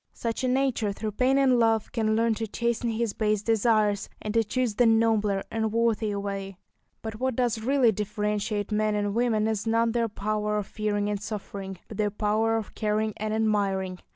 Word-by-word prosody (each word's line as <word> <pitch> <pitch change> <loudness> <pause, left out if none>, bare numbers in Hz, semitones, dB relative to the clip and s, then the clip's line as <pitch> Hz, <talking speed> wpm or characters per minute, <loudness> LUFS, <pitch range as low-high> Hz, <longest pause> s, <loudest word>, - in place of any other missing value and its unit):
Such 230 +2 -3
a - - +2
nature, 255 -5 +1
through 215 +2 -4
pain 255 +5 +2
and 260 -3 +4
love, 225 -2 +2
can 220 -2 +1
learn 230 0 +2
to 225 +1 -3
chasten 235 +2 -1
his 225 -1 -1
base 210 -1 0
desires, 215 -2 +2
and 210 - -4
to 225 0 +3
choose 245 +1 -1
the 240 +3 +3
nobler 220 -3 +2
and 220 -1 -1
worthier 220 -2 +1
way. 195 -1 -5 0.5
But 220 -1 -6
what 260 -1 0
does 240 -2 0
really 255 0 +3
differentiate 210 0 -2
men 215 0 +1
and 205 -1 -1
women 225 -2 +1
is 220 0 -2
not 230 0 +2
their 230 -1 0
power 210 +1 -1
of 205 - -2
fearing 205 0 -2
and 205 -1 -2
suffering, 200 -2 -6
but - - -9
their 210 -1 +1
power 215 +2 +1
of 220 - -5
caring 215 0 0
and 215 0 -3
admiring. 200 -4 0
215 Hz, 190 wpm, -27 LUFS, 210-230 Hz, 0.5 s, and